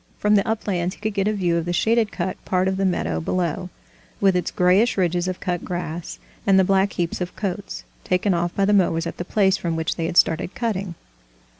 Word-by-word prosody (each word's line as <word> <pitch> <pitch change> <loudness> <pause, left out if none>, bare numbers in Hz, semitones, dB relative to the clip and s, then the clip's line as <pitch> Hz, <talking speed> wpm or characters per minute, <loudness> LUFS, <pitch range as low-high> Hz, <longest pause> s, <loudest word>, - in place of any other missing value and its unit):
From 210 0 +2
the 200 -1 +3
uplands 195 -4 -1
he - - -22
could 215 0 -2
get 200 0 0
a 215 - +1
view 175 -4 +1
of 165 - -2
the 175 - -2
shaded 220 +4 +2
cut 185 0 -4
part 185 0 +1
of 190 0 0
the 195 - +1
meadow 175 - 0
below, 180 - -2 0.5
with 195 -2 +3
its 180 - 0
grayish 185 +7 +3
ridges 175 -1 +1
of 185 -1 -3
cut 175 -2 -2
grass, 175 -2 -5 0.3
and 195 -1 +5
the 190 - +6
black 195 +1 +2
heaps 170 +1 -2
of 180 - -4
coats, 200 -1 -4 0.2
taken 185 +2 +1
off 175 0 0
by 195 - +2
the 205 - +2
mowers 170 -4 +2
at 170 - -5
the - - -3
place 195 -1 +2
from 170 -3 -2
which 160 0 -2
they 165 -1 -1
had 175 - -3
started 160 +3 +3
cutting. 200 -7 -2
185 Hz, 230 wpm, -22 LUFS, 175-200 Hz, 0.5 s, the